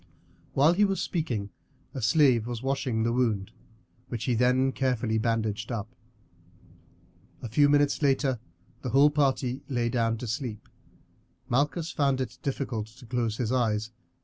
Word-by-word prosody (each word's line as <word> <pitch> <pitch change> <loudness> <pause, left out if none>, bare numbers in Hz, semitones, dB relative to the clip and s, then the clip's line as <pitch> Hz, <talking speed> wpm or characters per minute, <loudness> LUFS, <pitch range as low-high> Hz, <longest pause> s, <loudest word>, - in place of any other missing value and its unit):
While 150 +5 +5
he 205 +4 +3
was 195 -1 +1
speaking 120 - -2 0.4
a 130 - -5
slave 120 -1 +4
was 120 0 -5
washing 135 -4 0
the 115 +1 +1
wound, 110 -5 0 0.6
which 115 -2 -4
he 125 - +1
then 125 +3 +3
carefully 125 -4 0
bandaged 110 -1 -1
up. 115 +1 -4 1.5
A - - -3
few 145 +6 +4
minutes 145 0 +3
later 135 -3 +2 0.4
the 130 - -3
whole 140 +5 +5
party 135 -3 0
lay 120 -3 0
down 115 -1 0
to 125 - -6
sleep. 115 -2 -4 0.8
Malchus 150 +6 0
found 140 -3 +1
it 125 -2 -4
difficult 130 -6 -3
to 120 +4 -16
close 115 -2 -1
his 120 -2 -1
eyes. 110 -3 0
125 Hz, 150 wpm, -27 LUFS, 115-135 Hz, 1.5 s, While